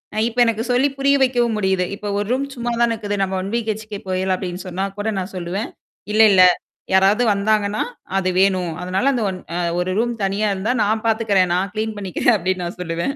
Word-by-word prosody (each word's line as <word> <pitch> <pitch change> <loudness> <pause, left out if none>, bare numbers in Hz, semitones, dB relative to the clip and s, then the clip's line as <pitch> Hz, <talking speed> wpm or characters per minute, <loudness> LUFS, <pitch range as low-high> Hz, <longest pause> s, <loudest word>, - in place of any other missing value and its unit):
அ - - -4
இப்ப 240 +1 -4
எனக்கு 225 -1 0
சொல்லி 265 +3 +3
புரிய 275 +1 +3
வைக்கவும் 240 -4 +1
முடியுது. 190 -2 +1
இப்ப 205 0 -5
1 205 - -2
ரூம் 270 +2 0
சும்மா 240 -1 -2
தான் 235 - +3
இருக்குது. 205 -2 -3
நம்ம 190 0 -2
ஒன் 195 +2 -5
வீ 235 - +1
ஹெச்கே 215 -1 -4
போயிர்லாம் 185 0 0
அப்பிடின்னு 180 0 -6
சொன்னா 185 +2 -2
கூட 220 +2 -1
நான் 190 +2 -6
சொல்லுவேன். 180 +5 -3 0.4
இல்ல, 220 - +5
இல்ல 185 -1 +7 0.5
யாராவது 195 +5 +4
வந்தாங்கன்னா, 205 +1 +1 0.3
அது 185 -1 +1
வேணும். 185 -3 +2
அதனால 185 +6 -1
அந்த 240 -4 -1
ஒன் 185 -1 -5 0.2
அ - - -1 0.2
1 180 +1 -1
ரூம் 240 +1 0
தனியா 205 +2 0
இருந்தா 195 +6 -1
நான் 215 +2 0
பார்த்துக்கிறேன், 210 -5 +2
நான் 195 +2 -1
கிளீன் 220 0 -2
பண்ணிக்கிறேன் 195 +5 +1
அப்பிடின்னு 185 -1 -2
நான் 175 +1 -7
சொல்லுவேன் 170 - -2
205 Hz, 205 wpm, -20 LUFS, 185-225 Hz, 0.5 s, இல்ல